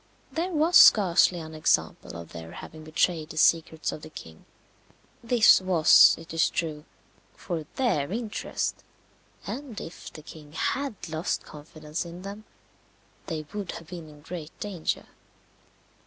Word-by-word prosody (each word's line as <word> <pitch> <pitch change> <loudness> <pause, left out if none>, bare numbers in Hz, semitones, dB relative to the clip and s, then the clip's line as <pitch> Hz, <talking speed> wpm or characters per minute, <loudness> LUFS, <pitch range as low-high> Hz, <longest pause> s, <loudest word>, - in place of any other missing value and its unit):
There 335 +3 -2
was 325 +2 +4
scarcely 180 -3 +6
an 160 -1 -8
example 155 - 0
of 85 0 -9
their 80 0 -9
having 155 +11 -10
betrayed 155 0 0
the 155 - -9
secrets 160 0 +2
of 155 - -8
the 155 - -10
king. 80 - -12 0.8
This 230 -4 +6
was, 180 -4 +6
it 165 0 -11
is 165 - +3
true, 155 -2 -3 0.5
for 165 -5 -5
their 170 - 0
interest; 220 0 -3 0.6
and 265 -5 -6
if 165 - -9
the 155 - -12
king 150 -1 -13
had 275 - -1
lost 160 +1 -2
confidence 150 +1 -7
in 175 +1 -10
them, 200 +2 -8 0.8
they 155 -3 -4
would 205 -4 -4
have 165 0 -10
been 170 -3 -8
in 150 -1 -15
great 160 0 -8
danger. 190 -6 -3
165 Hz, 140 wpm, -27 LUFS, 155-200 Hz, 0.8 s, scarcely